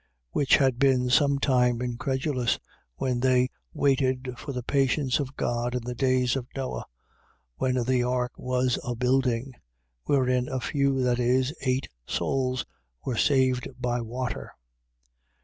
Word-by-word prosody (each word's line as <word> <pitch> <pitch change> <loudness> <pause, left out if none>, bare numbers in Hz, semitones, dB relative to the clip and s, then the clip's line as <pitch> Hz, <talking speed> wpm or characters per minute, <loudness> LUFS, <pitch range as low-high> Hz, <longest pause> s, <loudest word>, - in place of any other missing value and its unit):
Which 140 - +4
had 130 -3 +2
been 130 -2 +3
some 140 +1 +4
time 125 -3 +2
incredulous, 130 +1 -1 0.4
when 125 - -1
they 125 0 +3 0.2
waited 130 -2 +1
for 140 - -7
the 125 -2 -4
patience 135 +1 +1
of 140 -1 -4
God 120 +1 -1
in 125 - -2
the 125 +1 -4
days 130 0 +2
of 130 -2 -3
Noe, 135 -1 -4 0.7
when 130 -1 0
the 125 +1 +2
ark 125 0 0
was 125 0 0
a 120 - -3
building: 125 0 +1 0.5
wherein 125 -2 +2
a 130 - -2
few, 140 0 +1
that 125 -1 +1
is, 130 +3 +2
eight 130 0 0 0.2
souls, 130 -2 -1 0.4
were 130 - -1
saved 130 -1 +2
by 120 -1 -1
water. 125 +2 -4
130 Hz, 140 wpm, -27 LUFS, 125-135 Hz, 0.7 s, Which